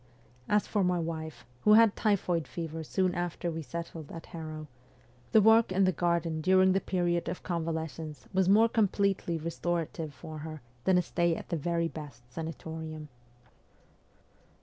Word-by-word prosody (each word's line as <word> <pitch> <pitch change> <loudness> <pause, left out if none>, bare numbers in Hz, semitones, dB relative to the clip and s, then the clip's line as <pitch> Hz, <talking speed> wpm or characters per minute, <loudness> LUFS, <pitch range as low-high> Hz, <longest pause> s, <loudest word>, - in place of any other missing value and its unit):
As 210 0 +3
for 205 -3 0
my 180 0 +2
wife, 160 -2 -4 0.2
who 210 - +6
had 225 -1 +7
typhoid 180 - +1
fever 165 -1 -5
soon 185 +3 0
after 175 -1 -2
we 165 0 -4
settled 160 +1 -7
at 165 - -8
Harrow, 155 -2 -7 0.7
the 220 - +6
work 220 -1 +6
in 190 +1 +3
the 185 - +4
garden 170 -2 0
during 185 +2 +5
the 195 +1 +2
period 175 -2 0
of 175 - -5
convalescence 160 -4 -4
was 190 0 +3
more 220 +3 +6
completely 200 -6 +1
restorative 165 -1 -3
for 155 +4 -9
her 155 -2 -7 0.2
than 190 -1 +5
a 180 - +3
stay 170 0 +1
at - - -8
the 175 - 0
very 170 +2 0
best 145 -7 -9
sanatorium. 160 -1 -6
170 Hz, 155 wpm, -30 LUFS, 160-185 Hz, 0.7 s, had